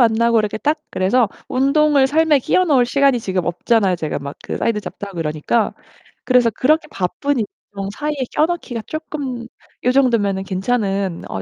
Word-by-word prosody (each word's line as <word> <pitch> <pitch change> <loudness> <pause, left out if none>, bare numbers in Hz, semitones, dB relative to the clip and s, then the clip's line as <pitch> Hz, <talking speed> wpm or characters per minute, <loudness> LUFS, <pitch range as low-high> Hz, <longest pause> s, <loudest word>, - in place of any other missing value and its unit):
안나고 235 0 +4
이렇게 210 -1 -1
딱 300 +6 0
그래서 205 +4 +2 0.2
운동을 275 +1 +3
삶에 310 +1 +3
끼워 370 +8 +2
넣을 270 -7 +4
시간이 275 -1 +3
지금 185 -4 -2
없잖아요 195 +2 +1
제가 155 -4 -3
막 140 0 -7
그 - - -4
사이드 225 -2 0
잡도 205 - -7
하고 195 - -10
그러니까. 160 +8 0 0.5
그래서 250 -2 +4
그렇게 305 +9 +1
바쁜 265 +10 -1
일정 200 -2 -6
사이에 300 0 -2 0.2
껴 310 - +3
넣기가 300 -9 -4
쪼끔 280 -6 -5 0.4
요 250 - +3
정도면은 230 -8 +2
괜찮은 195 -2 -1
어 95 - -4
235 Hz, 375 characters per minute, -19 LUFS, 195-275 Hz, 0.5 s, 안나고